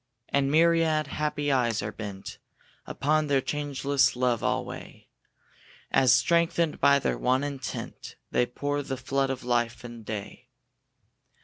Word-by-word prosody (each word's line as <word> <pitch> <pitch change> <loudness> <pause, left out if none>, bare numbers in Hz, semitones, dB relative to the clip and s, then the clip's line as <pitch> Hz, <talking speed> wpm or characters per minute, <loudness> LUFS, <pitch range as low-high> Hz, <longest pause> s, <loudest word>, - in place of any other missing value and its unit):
And 140 -1 +1
myriad 160 0 +3
happy 145 0 -2
eyes 120 -6 +1
are 105 - -3
bent 100 -3 -8 0.5
Upon 155 +2 +1
their 140 -1 +3
changeless 140 -1 0
love 125 -2 +1
alway; - - -4 0.8
As, 130 -3 +5
strengthened 165 +6 +2
by 140 0 +5
their 140 - -1
one 130 +2 +2
intent, 140 -5 -6 0.2
They 125 - +2
pour 145 +3 -2
the 135 -1 -4
flood 135 +1 -1
of 130 -1 -4
life 120 -1 0
and 120 -2 -9
day. 105 -1 -7
135 Hz, 130 wpm, -27 LUFS, 120-145 Hz, 0.8 s, As